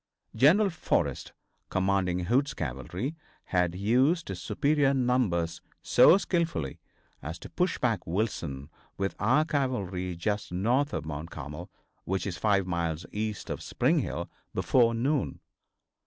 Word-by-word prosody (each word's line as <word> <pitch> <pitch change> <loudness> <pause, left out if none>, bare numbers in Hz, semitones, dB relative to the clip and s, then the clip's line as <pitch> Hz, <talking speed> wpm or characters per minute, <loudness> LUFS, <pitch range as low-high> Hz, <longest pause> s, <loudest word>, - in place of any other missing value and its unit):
General 190 +9 +5
Forrest, 165 - -1 0.4
commanding 95 -1 +1
Hood's 125 +9 +1
cavalry, 80 - -4 0.3
had 90 -2 0
used 130 - +2
his 90 -3 -5
superior 140 - +2
numbers 120 -10 +1 0.2
so 185 - +7
skillfully 170 - -1 0.4
as 80 +5 -5
to - - -11
push 180 0 0
back 115 -7 0
Wilson 80 -7 -2 0.3
with 95 0 -1
our 130 +9 +3
cavalry 100 - -1
just 100 +4 -2
north 120 +11 +1
of - - -3
Mount 75 +1 -5
Carmel, 75 -1 -7 0.3
which 95 +1 -2
is 95 -4 -3
five 100 -3 +2
miles 85 -2 -2
east 105 -1 -3
of - - -4
Spring - - +1
Hill, - - -3 0.3
before 115 -3 +3
noon. 135 +5 0
100 Hz, 130 wpm, -28 LUFS, 85-130 Hz, 0.4 s, so